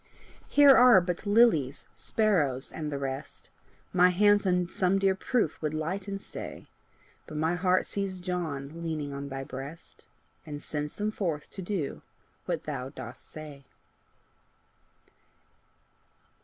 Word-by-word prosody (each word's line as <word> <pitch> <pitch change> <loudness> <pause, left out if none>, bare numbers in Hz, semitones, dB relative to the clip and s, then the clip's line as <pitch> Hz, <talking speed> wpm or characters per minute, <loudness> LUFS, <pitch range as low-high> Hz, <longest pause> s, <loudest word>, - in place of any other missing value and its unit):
Here 285 -2 +7
are 245 -5 +8
but 180 +2 -3
lilies, 205 - +3
sparrows, 155 - +1
and 150 -2 -4
the 140 - -2
rest! 135 -1 -6 0.4
My 180 0 +6
hands 205 +2 +4
on 180 -1 +2
some 185 +1 +1
dear 195 -1 +3
proof 195 - -1
would 155 0 -2
light 185 +6 -3
and 195 0 -3
stay! - - -8 0.6
But 155 - -6
my 160 +2 +1
heart 180 +1 +2
sees 195 -2 -3
John 165 -4 -4
leaning 155 -4 -3
on 140 0 -5
thy 135 0 -4
breast, 135 +5 -9 0.4
And 145 -1 -7
sends 150 0 -3
them 210 +1 -1
forth 165 -9 -3
to 195 - -7
do 175 -6 -3 0.5
what - - -2
thou 125 +1 -4
dost 140 - -10
say. 150 -3 -10
170 Hz, 135 wpm, -29 LUFS, 145-195 Hz, 0.6 s, are